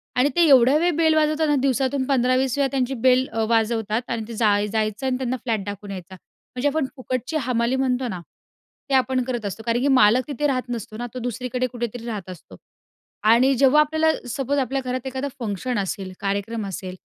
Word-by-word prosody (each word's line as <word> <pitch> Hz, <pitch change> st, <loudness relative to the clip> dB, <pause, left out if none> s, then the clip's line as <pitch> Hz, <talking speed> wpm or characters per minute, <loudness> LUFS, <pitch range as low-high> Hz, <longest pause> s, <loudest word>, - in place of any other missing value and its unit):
आणि 255 Hz, +3 st, +3 dB
ते 345 Hz, -, +3 dB
एवढ्या 260 Hz, 0 st, +6 dB
वेळी 345 Hz, +2 st, +2 dB
बेल 320 Hz, -1 st, +4 dB
वाजवताना 310 Hz, -1 st, +2 dB
दिवसातून 265 Hz, +1 st, +1 dB
15-20 255 Hz, 0 st, +1 dB
वेळा 280 Hz, -, +2 dB
त्यांची 265 Hz, -1 st, 0 dB
बेल 255 Hz, +1 st, +4 dB
अ, 225 Hz, -, -1 dB
वाजवतात 225 Hz, -1 st, +1 dB
आणि 230 Hz, -1 st, -2 dB
ते 230 Hz, -, -7 dB
जाय 210 Hz, -2 st, +2 dB
जायचं 215 Hz, +3 st, -2 dB
आणि 255 Hz, -1 st, 0 dB
त्यांना 255 Hz, -1 st, -2 dB
फ्लॅट 225 Hz, -5 st, -1 dB
दाखवून 205 Hz, 0 st, -7 dB
यायचा. 185 Hz, -1 st, -8 dB, 0.4 s
म्हणजे 250 Hz, +3 st, 0 dB
आपण 305 Hz, 0 st, 0 dB
फुकटची 255 Hz, +3 st, -3 dB
हमाली 235 Hz, 0 st, +1 dB
म्हणतो 260 Hz, -1 st, 0 dB
ना, 185 Hz, -6 st, -5 dB, 0.7 s
ते -, -, -1 dB
आपण 260 Hz, -1 st, +2 dB
करत 240 Hz, -3 st, -4 dB
असतो. 205 Hz, +2 st, -5 dB
कारण 235 Hz, 0 st, +1 dB
की 275 Hz, -, +1 dB
मालक 255 Hz, -1 st, +4 dB
तिथे 295 Hz, 0 st, -1 dB
राहत 255 Hz, -2 st, -2 dB
नसतो 220 Hz, -3 st, -5 dB
ना, 240 Hz, -, -4 dB
तो 255 Hz, -, -5 dB
दुसरीकडे 250 Hz, +1 st, -2 dB
कुठेतरी 240 Hz, -1 st, -5 dB
राहत 210 Hz, -6 st, -5 dB
असतो 165 Hz, -, -11 dB, 0.7 s
आणि 235 Hz, +5 st, +5 dB
जेव्हा 275 Hz, +4 st, +5 dB
आपल्याला 315 Hz, +1 st, +2 dB, 0.2 s
सपोज 270 Hz, +3 st, -1 dB
आपल्या 270 Hz, +1 st, -1 dB
घरात 255 Hz, 0 st, -3 dB
एखादं 265 Hz, +1 st, -3 dB
फंक्शन 230 Hz, +2 st, -3 dB
असेल, 190 Hz, -1 st, -4 dB
कार्यक्रम 200 Hz, +2 st, -2 dB
असेल, 185 Hz, -1 st, -6 dB
250 Hz, 195 wpm, -23 LUFS, 220-265 Hz, 0.7 s, एवढ्या